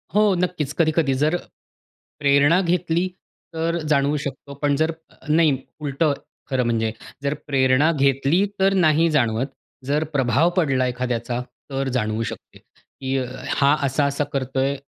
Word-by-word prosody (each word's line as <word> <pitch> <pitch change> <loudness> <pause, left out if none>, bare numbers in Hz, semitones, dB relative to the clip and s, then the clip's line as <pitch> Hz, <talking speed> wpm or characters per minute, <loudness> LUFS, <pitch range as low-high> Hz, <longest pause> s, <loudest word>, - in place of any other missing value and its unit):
हो 210 - +5
नक्कीच, 175 -5 -1
कधी-कधी 160 -4 +2
जर 150 +5 +1 0.8
प्रेरणा 145 +4 +4
घेतली 175 0 0 0.5
तर 165 +1 0
जाणवू 140 +1 +2
शकतो. 140 0 -6
पण 145 -1 +2
जर 160 +2 +1 0.2
अ, - - -23
नाही 155 -3 +4 0.2
उलटं 145 +1 +1 0.4
खरं 130 -2 +1
म्हणजे 115 -1 0 0.3
जर 140 0 0
प्रेरणा 135 +2 +3
घेतली 140 +5 +2
तर 195 0 +4
नाही 165 -3 +4
जाणवत. 120 -3 +1 0.4
जर 145 +3 +1
प्रभाव 135 +4 +3
पडला 135 -7 +2
एखाद्याचा 125 -1 -2 0.3
तर 135 0 -1
जाणवू 110 -1 -1
शकते - - -8
की 135 0 -6
अ, 130 - -1 0.2
हां, 140 +1 +3
असा-असा 140 +1 0
करतोय. 135 +1 0
140 Hz, 135 wpm, -22 LUFS, 130-160 Hz, 0.8 s, हो